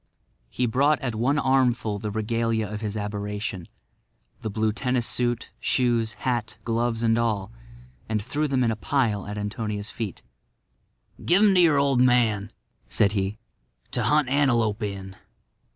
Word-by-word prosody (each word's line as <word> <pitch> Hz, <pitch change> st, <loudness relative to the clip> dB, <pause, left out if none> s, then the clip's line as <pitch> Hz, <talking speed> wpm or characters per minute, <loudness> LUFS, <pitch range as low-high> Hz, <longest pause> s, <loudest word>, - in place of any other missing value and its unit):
He 125 Hz, -, -1 dB
brought 140 Hz, +5 st, +2 dB
at 125 Hz, -3 st, -2 dB
one 125 Hz, +7 st, +1 dB
armful 125 Hz, -6 st, +1 dB
the 105 Hz, -, -4 dB
regalia 110 Hz, +1 st, -1 dB
of 105 Hz, +1 st, -6 dB
his 105 Hz, -1 st, -3 dB
aberration—the 105 Hz, 0 st, -7 dB
blue 110 Hz, +1 st, 0 dB
tennis 125 Hz, 0 st, 0 dB
suit, 120 Hz, 0 st, 0 dB
shoes, 120 Hz, -3 st, +1 dB
hat, 120 Hz, -4 st, -1 dB
gloves 115 Hz, 0 st, -1 dB
and 115 Hz, 0 st, +3 dB
all, 110 Hz, -3 st, -1 dB, 0.6 s
and 110 Hz, -1 st, 0 dB
threw 150 Hz, +9 st, -2 dB
them 135 Hz, -2 st, +1 dB
in 115 Hz, -, +2 dB
a -, -, -1 dB
pile 110 Hz, -4 st, 0 dB
at 105 Hz, 0 st, -5 dB
Antonia's 105 Hz, 0 st, -4 dB
feet. 110 Hz, -6 st, -5 dB, 1.0 s
"Give 185 Hz, +5 st, +4 dB
them 205 Hz, -2 st, +6 dB
to 180 Hz, -, +5 dB
your 160 Hz, -4 st, +5 dB
old 140 Hz, -3 st, +3 dB
man," 115 Hz, -5 st, +3 dB, 0.4 s
said 100 Hz, -, +3 dB
he, 100 Hz, 0 st, -2 dB, 0.5 s
"to -, -, 0 dB
hunt 150 Hz, -2 st, +3 dB
antelope 120 Hz, -6 st, +2 dB
in." 95 Hz, -2 st, -5 dB
115 Hz, 150 wpm, -25 LUFS, 105-125 Hz, 1.0 s, them